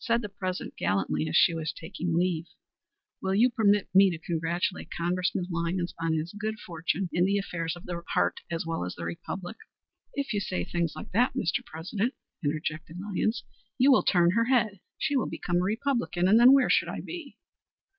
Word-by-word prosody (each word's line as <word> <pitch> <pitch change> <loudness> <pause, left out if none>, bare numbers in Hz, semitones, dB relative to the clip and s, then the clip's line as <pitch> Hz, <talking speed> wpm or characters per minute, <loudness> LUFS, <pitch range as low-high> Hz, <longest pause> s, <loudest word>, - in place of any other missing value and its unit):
Said 235 -1 +1
the 210 - -4
President 185 -2 -4
gallantly 80 -5 0
as 80 - -2
she 170 - +6
was 160 -1 -2
taking 170 0 -3
leave: 175 -2 0 0.7
"Will 190 0 0
you 240 +5 +5
permit 205 -3 +3
me 195 +1 +7
to 170 - -3
congratulate 170 +2 -2
Congressman 180 +1 -1
Lyons 170 +1 -1
on 165 -1 0
his 160 +4 -3
good 215 +1 -3
fortune 170 +2 -2
in 175 - +3
the 200 +2 +2
affairs 170 -4 -3
of 175 - -12
the 175 -1 -4
heart - - +2
as 165 -1 -2
well 165 - -2
as 90 - -5
in 85 0 -4
politics?" 190 +4 -6 0.6
"If 280 -4 -2
you 205 - +1
say 190 -2 -2
things 170 -3 -1
like - - -8
that, 240 +7 +2
Mr. 160 - 0
President," 195 - -3 0.3
interjected 155 +2 -3
Lyons, 205 +3 -1 0.3
"you 265 +2 +6
will 260 - +6
turn 175 -2 +4
her 230 +4 +2
head; 235 -6 +2 0.2
she 285 - 0
will 260 - +1
become 175 0 -2
a - - +3
Republican, 225 -4 0
and 215 +4 +6
then 245 +2 +9
where 270 -2 +5
should - - +3
I - - -4
be?" 335 -5 -8
180 Hz, 195 wpm, -28 LUFS, 165-215 Hz, 0.7 s, then